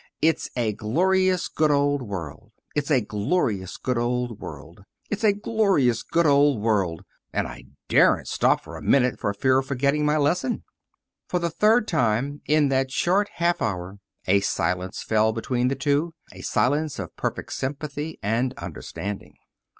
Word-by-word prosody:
'It's 160 +1 +1
a 115 -3 +1
glorious, 185 - +1
good 155 -1 +1
old 145 -1 +2
world; 95 - -7 0.2
it's 145 0 -1
a 135 -5 +4
glorious, 105 - -1
good 125 -2 -1
old 120 -1 -1
world; 85 +5 -10 0.3
it's 210 +1 -3
a 215 - +6
glorious, 200 - +1
good 170 0 +1
old 145 -3 +4
world.' 100 -6 0 0.3
And - - -1
I - - -10 0.2
daren't - - +4
stop - - +2
for - - -10
a - - -8
minute 125 -2 +2
for 100 - 0
fear 130 +6 +2
of 135 - -5
forgetting 140 +3 +1
my 150 +1 +2
lesson." 170 - 0 0.6
For 180 - 0
the 170 -1 -1
third 215 +5 +3
time 125 +5 0
in 150 -1 +3
that 135 0 +1
short 190 +9 +1
half 170 0 +1
hour 95 -1 -3 0.3
a 100 +2 +4
silence 90 -1 -2
fell 110 0 +2
between 125 +2 -1
the 135 - 0
two 145 +4 0 0.2
a - - -10
silence 145 +3 0
of 90 -5 -6
perfect - - -4
sympathy 145 +3 -4
and 115 +5 0
understanding. 85 +3 -6
135 Hz, 160 wpm, -24 LUFS, 105-155 Hz, 0.6 s, a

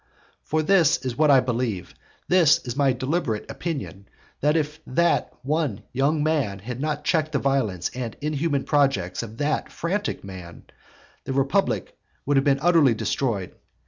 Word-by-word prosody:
For 155 0 -1
this 170 -2 +4
is 125 -2 -2
what 155 0 +3
I 135 -2 +7
believe, 120 -7 -2 0.3
this 175 -5 +5
is 120 -1 -4
my 140 -1 +3
deliberate 130 -3 -2
opinion, 135 - -5 0.3
that 150 +3 +2
if 150 0 -2
that 170 +6 +1
one 140 -7 -1
young 145 +4 +1
man 145 -11 0
had 120 +6 -6
not 150 -1 -2
checked 155 -1 0
the - - +3
violence 115 -11 0
and 125 -3 -5
inhuman 150 -1 -1
projects 120 -12 +1
of 115 -1 -8
that 145 +1 -1
frantic 195 +4 -2
man, 90 -3 -10 0.6
the 135 - -3
republic 140 +9 0 0.3
would 145 - +1
have 135 - +4
been 140 -1 +3
utterly 165 -8 +5
destroyed. 110 -6 -2
140 Hz, 155 wpm, -24 LUFS, 120-155 Hz, 0.6 s, I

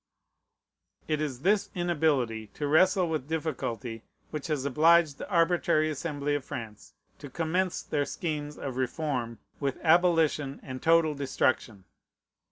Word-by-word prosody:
It 155 -1 0
is 135 -5 -3
this 200 +5 +2
inability 145 -11 0
to 150 - -2
wrestle 185 +5 +4
with 155 -4 -3
difficulty 125 -8 -3 0.3
which 150 -2 -4
has 150 -4 -1
obliged 155 +2 +4
the - - -7
arbitrary 170 -3 +2
Assembly 145 -1 -2
of 145 -2 -1
France 115 -7 -8 0.2
to 145 - -9
commence 175 +5 -1
their 145 -2 -1
schemes 150 -3 -4
of 130 -2 -5
reform 130 -3 -2 0.2
with 140 -2 -1
abolition 160 -4 +3
and 130 -1 -7
total 165 -1 +4
destruction. 130 -7 -1
150 Hz, 130 wpm, -28 LUFS, 135-165 Hz, 0.3 s, wrestle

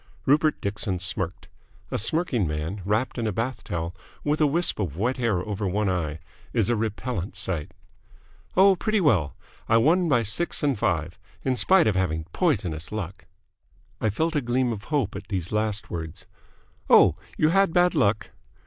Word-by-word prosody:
Rupert 150 +3 +3
Dixon 100 -1 -2
smirked. 90 0 -3 0.4
A - - 0
smirking 125 - 0
man, 75 +6 -3
wrapped 110 +5 0
in 115 - -1
a - - 0
bath 115 +6 -3
towel, 85 +1 -4 0.3
with 150 +1 0
a 150 - +5
wisp 170 0 +1
of 85 -7 -3
wet 120 +6 0
hair 110 -8 0
over 105 -1 -2
one 100 +1 0
eye, 80 -4 -2 0.4
is - - +2
a - - +2
repellent 110 -3 -3
sight. 90 -5 -3 0.8
"Oh, 195 +1 +7
pretty 215 +3 0
well. 105 - +2 0.3
I 115 - +5
won 165 +8 +3
by 120 -5 +3
six 130 +11 -1
and 140 -2 +2
five. 80 -3 -1 0.2
In 130 - +1
spite 185 - +4
of 110 - +3
having 80 -4 0
poisonous 95 - 0
luck." 100 -3 -6 0.7
I 110 - +1
felt 160 +10 -1
a 145 - +2
gleam 120 0 0
of 100 -1 -8
hope 140 -10 -1
at 100 0 -7
these 90 -4 -3
last 105 -1 -1
words. 80 -2 -6 0.6
"Oh, - - +7 0.2
you 155 - +3
had 195 0 +3
bad 175 +1 +3
luck?" 105 - +1
110 Hz, 175 wpm, -25 LUFS, 95-145 Hz, 0.8 s, Oh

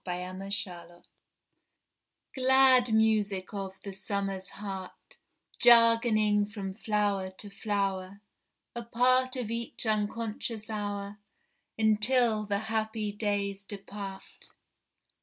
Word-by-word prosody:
The 180 0 -4
Humming 185 +2 -7 0.2
Bee 175 +8 -16
Glad 260 -2 +5
music 210 -4 +1
of 195 -2 -4
the 200 - -6
summer's 195 -1 -3
heart, 195 -2 -8 0.4
Jargoning 230 -3 +5
from 200 -3 -6
flower 205 -2 -1
to 200 +2 -9
flower, 195 -1 -2 0.6
A 235 - -3
part 255 +2 +2
of 240 -4 -4
each 235 +1 -4
unconscious 220 0 -2
hour 205 -1 -4 0.6
Until 220 0 +2
the 200 -1 +1 0.2
happy 220 -1 -1
days 200 -1 -2
depart! 195 -1 -8
210 Hz, 100 wpm, -29 LUFS, 195-225 Hz, 0.6 s, Glad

